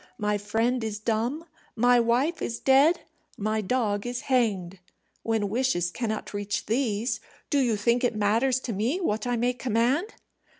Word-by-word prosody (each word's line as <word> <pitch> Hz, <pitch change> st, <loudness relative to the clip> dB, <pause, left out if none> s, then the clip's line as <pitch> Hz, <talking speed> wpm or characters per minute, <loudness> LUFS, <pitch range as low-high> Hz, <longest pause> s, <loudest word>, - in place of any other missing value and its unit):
My 210 Hz, -1 st, 0 dB
friend 225 Hz, +4 st, 0 dB
is 215 Hz, -2 st, -3 dB
dumb, 230 Hz, +9 st, -1 dB, 0.3 s
my 245 Hz, +1 st, +4 dB
wife 245 Hz, +8 st, +1 dB
is 235 Hz, -, -3 dB
dead, 275 Hz, +6 st, +4 dB, 0.4 s
my 215 Hz, +1 st, -1 dB
dog 210 Hz, -1 st, -1 dB
is 245 Hz, 0 st, -3 dB
hanged. 200 Hz, -9 st, 0 dB, 0.4 s
When 225 Hz, -2 st, 0 dB
wishes 200 Hz, -6 st, 0 dB
cannot 220 Hz, 0 st, -4 dB
reach 205 Hz, 0 st, -3 dB
these, 230 Hz, -1 st, 0 dB, 0.3 s
do 290 Hz, -, +3 dB
you 240 Hz, -5 st, +2 dB
think 235 Hz, +4 st, +1 dB
it 245 Hz, -, +1 dB
matters 225 Hz, +5 st, +2 dB
to 235 Hz, -, -4 dB
me 230 Hz, -, 0 dB
what 220 Hz, -, -1 dB
I 245 Hz, -, +1 dB
may 245 Hz, +2 st, +1 dB
command?" 250 Hz, -, 0 dB
230 Hz, 160 wpm, -26 LUFS, 210-250 Hz, 0.4 s, my